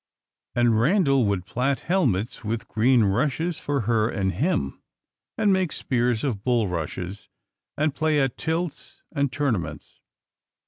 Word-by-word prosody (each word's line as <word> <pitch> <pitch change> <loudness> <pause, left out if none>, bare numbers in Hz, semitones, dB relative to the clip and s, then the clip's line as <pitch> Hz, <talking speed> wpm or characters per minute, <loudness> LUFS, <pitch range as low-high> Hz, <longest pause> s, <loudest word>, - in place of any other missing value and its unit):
And 120 -2 +3
Randal 140 - +3
would 95 -3 -1
plait 125 +6 0
helmets 125 - 0
with 110 +1 -3
green 120 +1 +3
rushes 140 - 0
for 140 -2 -1
her 110 0 +1
and 95 -4 0
him, 130 - -1 0.6
and 210 -3 +3
make 185 -4 +1
spears 120 -3 0
of 115 -8 -2
bulrushes, 95 - -2 0.5
and 150 -1 +1
play 155 0 +1
at 135 -3 +1
tilts 160 -1 -4
and 140 -3 0
tournaments. 130 - -3
125 Hz, 130 wpm, -25 LUFS, 110-150 Hz, 0.6 s, And